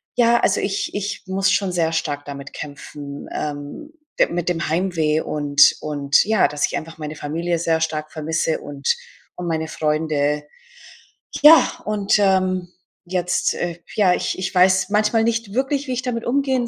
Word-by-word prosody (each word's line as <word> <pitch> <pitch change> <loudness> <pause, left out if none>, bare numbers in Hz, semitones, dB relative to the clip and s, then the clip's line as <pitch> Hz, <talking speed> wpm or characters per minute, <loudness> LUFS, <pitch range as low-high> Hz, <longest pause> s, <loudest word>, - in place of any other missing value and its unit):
ja, 235 -1 +4
also 195 - +2
ich 195 0 -2
ich 205 -1 -4
muss 195 +1 +1
schon 190 0 +1
sehr 165 -2 0
stark 145 -3 -2
damit 140 -1 -8
kämpfen, 145 0 -8
ähm, 150 - -6 0.3
de - - +5
mit 175 0 -2
dem 170 -2 -1
Heimweh 160 -2 +1
und 145 -1 +4
und 145 -2 +2
ja, 220 -2 +3
dass 145 -1 0
ich - - -5
einfach 160 0 -8
meine 155 0 -6
Familie 165 +4 -2
sehr 165 -1 +1
stark 155 -1 -2
vermisse 160 0 -1
und 140 -1 -1 0.4
und 180 - -5
meine 160 -1 -1
Freunde. 150 -2 0 1.0
Ja, 315 +2 +9 0.2
und, 210 -1 +1
ähm, 185 -2 +1 0.4
jetzt 180 0 0
äh, 175 -1 -4 0.2
ja, 195 -4 +4
ich 185 - -2
ich 190 - -3
weiß 185 +2 +4
manchmal 215 +2 +2
nicht 230 -3 -1
wirklich, 270 +3 -1
wie 255 - -2
ich 250 - -3
damit 235 -2 -3
umgehen 260 -1 +1
175 Hz, 165 wpm, -21 LUFS, 150-205 Hz, 1.0 s, Ja